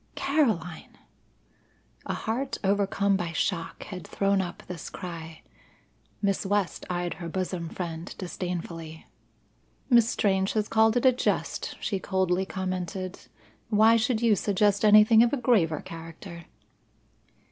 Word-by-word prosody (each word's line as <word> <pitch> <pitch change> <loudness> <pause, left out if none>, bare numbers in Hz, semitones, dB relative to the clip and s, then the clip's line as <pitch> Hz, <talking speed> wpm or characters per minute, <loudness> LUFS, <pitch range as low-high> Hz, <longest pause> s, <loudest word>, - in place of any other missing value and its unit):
"Caroline!" 220 - -1 1.1
A - - -2
heart 255 +5 -3
overcome 200 0 +2
by 175 -3 -3
shock 170 0 -2
had 180 -5 -8
thrown 195 -1 +1
up 175 -2 -6
this 180 -3 -7
cry. 165 -3 -8 0.8
Miss 195 -1 +1
West 200 -2 -1
eyed 175 -1 -2
her 170 - -4
bosom 180 -1 -3
friend 170 0 -6
disdainfully. 170 -3 -6 0.9
"Miss 235 -2 +6
Strange 190 -1 +1
has 215 -1 0
called 220 +1 +3
it 245 - 0
a 260 - +8
jest," 250 - -2
she 195 - -2
coldly 190 0 0
commented. 185 0 -4 0.5
"Why 220 +1 +5
should 230 0 +1
you 225 -3 +5
suggest 205 +1 +1
anything 215 +1 +7
of 235 +2 +3
a - - +2
graver 200 - +2
character?" 165 +1 -10
190 Hz, 125 wpm, -27 LUFS, 175-215 Hz, 1.1 s, a